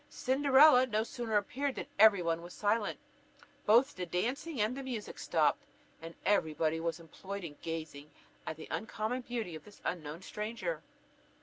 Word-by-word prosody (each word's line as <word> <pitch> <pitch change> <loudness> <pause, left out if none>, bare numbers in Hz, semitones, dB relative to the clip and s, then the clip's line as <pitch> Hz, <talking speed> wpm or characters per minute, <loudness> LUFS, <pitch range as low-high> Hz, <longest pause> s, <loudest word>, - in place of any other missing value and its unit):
Cinderella 265 0 +5
no 220 -2 +1
sooner 230 -2 -1
appeared 265 +7 -1
than - - -4
every 205 -4 +7
one 165 0 0
was 175 +1 -10
silent; 210 +1 0 0.7
both 240 +7 +5
the 180 -1 -4
dancing 255 - -2
and 215 +4 +1
the 275 - -5
music 245 -6 -5
stopped, - - +2 0.4
and 165 +1 -8
every 175 -6 +2
body 160 +1 +1
was 165 +1 -2
employed 190 +4 -8
in 150 -4 -7
gazing 155 -3 -6 0.4
at 155 - -4
the 160 - -9
uncommon 220 +3 -2
beauty 235 -7 -4
of 155 - -8
this 205 -1 -16
unknown 165 0 -4
stranger. 230 - -4
210 Hz, 165 wpm, -33 LUFS, 170-250 Hz, 0.7 s, every